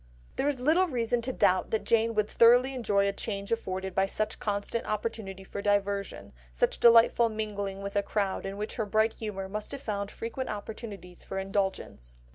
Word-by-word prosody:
There 280 - 0
is 285 -3 0
little 325 +8 +3
reason 240 -4 0
to 255 +3 -2
doubt 185 -6 +2
that 220 - -1
Jane 230 0 +2
would 210 -1 +2
thoroughly 245 +4 +5
enjoy 205 -6 +1
the 200 - 0
change 200 0 -5
afforded 190 -4 -2
by 195 +1 +2
such 215 +2 -2
constant 205 +2 -2
opportunity 210 -3 -4
for 200 +1 -6
diversion, 200 -1 -1 0.2
such - - 0
delightful 235 0 +6
mingling 205 -3 -4
with 200 +1 -5
a 205 - +3
crowd 200 -1 -1
in 195 +1 -5
which 210 +1 -4
her 220 - 0
bright 220 +2 +2
humour 195 -3 -5
must 210 +2 -5
have 275 - -6
found 200 -2 -3
frequent 235 +5 -5
opportunities 205 -4 -7
for 195 - -6
indulgence. 190 - -3
210 Hz, 185 wpm, -29 LUFS, 200-230 Hz, 0.2 s, delightful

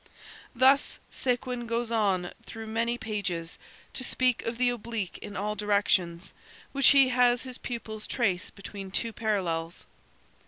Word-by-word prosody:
Thus 265 +3 +4
Séguin 250 -1 -1
goes 230 0 -1
on 195 -6 +1 0.2
through 225 -1 -7
many 230 +2 0
pages, 195 -7 -3 0.3
to 255 - -3
speak 255 -1 +2
of 230 0 -2
the 245 0 +3
oblique 230 -5 -4
in 205 - -7
all 210 +2 -1
directions, 195 -4 +1 0.4
which 275 -1 +5
he 275 -2 +7
has 245 -1 +3
his 255 -1 -7
pupils 220 -3 -5
trace 195 -8 0
between 195 0 -8
two 225 +4 -1
parallels. 175 -7 -2
225 Hz, 135 wpm, -28 LUFS, 195-245 Hz, 0.4 s, he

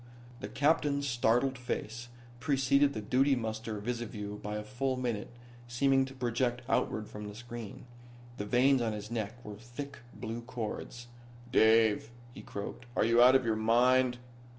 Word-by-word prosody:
The - - -5
captain's 140 -1 +1
startled 120 +1 +2
face 120 -1 -4 0.3
preceded 140 +1 +3
the 110 - -3
duty 135 +5 +3
muster 110 -2 -4
visiview 105 -2 -5
by 105 0 -4
a 105 - -3
full 130 +3 -2
minute, 120 -5 -2 0.4
seeming 135 +2 +3
to 135 0 -10
project 120 0 -1
outward 110 -5 0
from 105 0 -8
the 105 - -8
screen. 120 -1 -8 0.5
The 105 - -3
veins 130 +4 +4
on 115 -2 0
his 105 +1 -7
neck 115 +1 -4
were 105 -1 -7
thick 140 +5 -8 0.2
blue 115 +2 -5
cords. 120 0 -6 0.5
"Dave," 110 -2 +4 0.2
he - - -9
croaked. 120 +4 -7
"Are - - +3
you 115 +1 +5
out 125 +2 +8
of 130 -2 +3
your 110 -1 +1
mind? 125 +3 +3
120 Hz, 155 wpm, -31 LUFS, 110-130 Hz, 0.5 s, out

